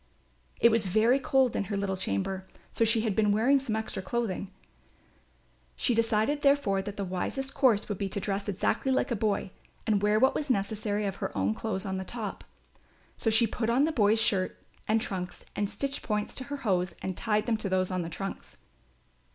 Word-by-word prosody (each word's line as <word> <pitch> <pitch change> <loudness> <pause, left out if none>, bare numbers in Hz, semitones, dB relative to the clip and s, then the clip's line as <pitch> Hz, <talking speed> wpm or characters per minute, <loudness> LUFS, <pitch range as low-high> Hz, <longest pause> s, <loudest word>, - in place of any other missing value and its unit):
It 235 - +6
was 220 -3 +2
very 225 +7 +4
cold 265 -2 +2
in - - 0
her 205 +1 -3
little 195 -1 -1
chamber, 185 - -2 0.2
so - - +1
she 225 0 +3
had 215 -3 -1
been 210 -2 +3
wearing 245 +7 +4
some 240 -5 -2
extra 220 -3 -3
clothing; 205 -3 -2 1.3
she 245 - +1
decided 225 +5 +1
therefore 275 -9 +3
that 205 +1 -7
the 200 - -2
wisest 265 +9 -3
course 245 -7 +3
would 205 -3 -4
be 195 - -1
to 200 - -3
dress 200 +1 -2
exactly 205 +7 0
like 260 0 +1
a - - +2
boy 205 -3 -1 0.3
and 210 -3 +2
wear 210 +1 +3
what 265 +3 +4
was 295 -2 -2
necessary 210 -1 0
of 195 - -3
her - - -3
own 95 +2 +1
clothes 195 - -3
on 190 -1 -2
the 190 - -3
top. 215 0 -5 0.7
So 225 - 0
she 225 +2 +5
put 225 0 -2
on 265 +6 +3
a - - 0
boy's 220 -5 +3
shirt 195 -4 +1 0.3
and 220 +1 +3
trunks 180 -4 -5
and 205 -1 -1
stitched 275 +7 -3
points 210 -2 -2
to 260 - -5
her 285 +2 -4
hose 180 -3 +1
and 190 -1 -2
tied 210 +1 0
them 230 -2 +1
to 205 - -3
those 185 0 +1
on 185 -1 -1
the 165 - -4
trunks. 195 +4 -6
210 Hz, 205 wpm, -29 LUFS, 195-235 Hz, 1.3 s, It